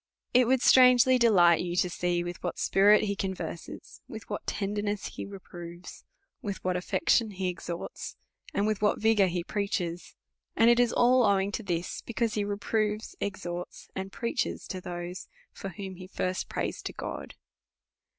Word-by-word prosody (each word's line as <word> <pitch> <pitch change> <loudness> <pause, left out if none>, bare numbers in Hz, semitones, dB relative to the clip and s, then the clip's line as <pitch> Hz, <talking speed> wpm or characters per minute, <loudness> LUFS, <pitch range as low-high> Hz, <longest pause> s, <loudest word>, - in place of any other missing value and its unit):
It 250 -1 +5
would 260 0 +3
strangely 255 0 +7
de 235 -1 +5
light 175 -5 +5
you 175 -1 -3
to 180 - +2
see 175 0 -1
with 175 0 -6
what 175 - -3
spirit 205 +2 +5
he 200 -1 -1
converses, 180 -4 -6
with - - -9
what - - -4
tenderness 205 0 -2
he - - -7
reproves, 175 -3 -10 0.4
with 205 -6 -3
what 185 -1 0
affection 220 - +2
he 190 -2 -2
exhorts, 175 -1 -6 0.4
and 200 - 0
with 215 -2 0
what 210 - +2
vigour 220 -3 +4
he 175 -1 -2
preaches; 180 -3 -3 0.4
and 230 +1 +6
it 240 - +4
is 240 -1 +4
all 250 +1 +4
owing 200 -2 +2
to 220 - -3
this, 175 -4 -3
because 235 -1 -1
he 210 - 0
reproves, 210 +1 -1
exhorts, 180 -3 -5
and 190 0 -4
preaches 235 +3 -2
to 185 - -4
those 175 +1 -6 0.2
for 195 - -7
whom 190 +1 -7
he 185 0 -9
first 185 0 -3
prays - - -3
to - - -5
God. - - -6
195 Hz, 170 wpm, -29 LUFS, 180-215 Hz, 0.4 s, strangely